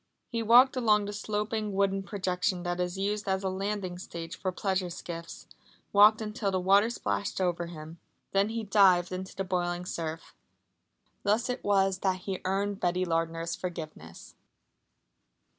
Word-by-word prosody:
He 230 -1 -2
walked 245 +4 +6
along 215 -4 +3
the 205 - -5
sloping 210 0 -2
wooden 195 0 +1
projection 185 -2 -1
that 175 0 -2
is 180 +1 -2
used 205 +1 -2
as 190 0 0
a 190 - 0
landing 190 -1 -3
stage 170 -1 -7
for 185 0 -2
pleasure 190 -1 -1
skiffs, 170 -1 -8 0.5
walked 210 +2 +7
until 210 -1 -2
the 190 -1 0
water 200 +4 +4
splashed 205 -4 -2
over 175 -2 0
him. 160 0 -10 0.3
Then 195 +2 +2
he 225 0 -3
dived 190 -4 +4
into 185 +1 -6
the 195 - -2
boiling 180 -1 -2
surf. 165 -2 -5 0.9
Thus 225 +5 +1
it 250 - -5
was 195 -2 +2
that 185 -1 0
he 190 -1 -4
earned 200 +1 -1
Betty 180 +1 +1
Lardner's 165 0 -1
forgiveness. 155 - -8
190 Hz, 155 wpm, -29 LUFS, 175-205 Hz, 0.9 s, walked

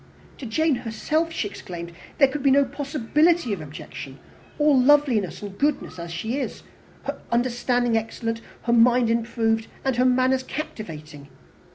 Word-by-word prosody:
"To 260 - -6
Jane 305 +4 +2
herself," 255 +8 -1
she 220 - -2
exclaimed, 170 -3 -8 0.3
"there 275 - +6
could 280 +2 -4
be 275 - +4
no 280 +1 +5
possibility 290 +1 +1
of 185 - -4
objection, 150 0 -9 0.4
all 295 -1 +4
loveliness 255 - +3
and 200 -1 -7
goodness 280 -8 -1
as 170 0 -6
she 220 +11 -2
is! - - -5 0.4
Her - - -4
understanding 245 0 +1
excellent, 225 +1 -2 0.2
her 235 - +1
mind 240 0 +5
improved, 225 -1 0 0.2
and 265 -3 +1
her 250 - +3
manners 255 +1 +3
captivating. 155 - -7
240 Hz, 150 wpm, -24 LUFS, 220-275 Hz, 0.4 s, there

